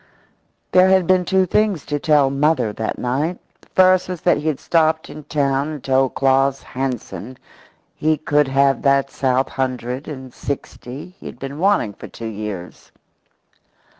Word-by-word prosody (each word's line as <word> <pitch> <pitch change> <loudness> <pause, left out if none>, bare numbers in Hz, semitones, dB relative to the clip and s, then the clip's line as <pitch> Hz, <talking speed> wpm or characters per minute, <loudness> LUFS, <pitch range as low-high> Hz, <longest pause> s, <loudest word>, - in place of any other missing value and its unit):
There 185 +1 +6
had 190 -1 +4
been 185 0 +3
two 190 +1 +3
things 205 -3 +1
to 145 0 -2
tell 145 -3 +3
"mother" 140 -6 +1
that 110 +1 -3
night. 145 +8 -1 0.2
The - - -25
first 185 0 +4
was 180 -3 -5
that - - +3
he 150 +2 -4
had 150 -4 0
stopped 160 -1 +1
in 150 -1 -10
town 140 -1 0
and 150 -4 -6
told 135 -1 +1
Claus 135 0 +2
Hansen 125 -3 -5 0.6
he 155 0 +1
could 150 -1 +2
have 135 0 +2
that 140 -1 +2
south 130 0 0
hundred 130 0 -3
and 130 -4 -8
sixty 140 +1 -6
he - - -9
had - - -9
been 135 +3 -7
wanting 190 - +2
for - - -10
two 115 - -9
years. 105 -5 -7
140 Hz, 165 wpm, -20 LUFS, 130-160 Hz, 0.6 s, There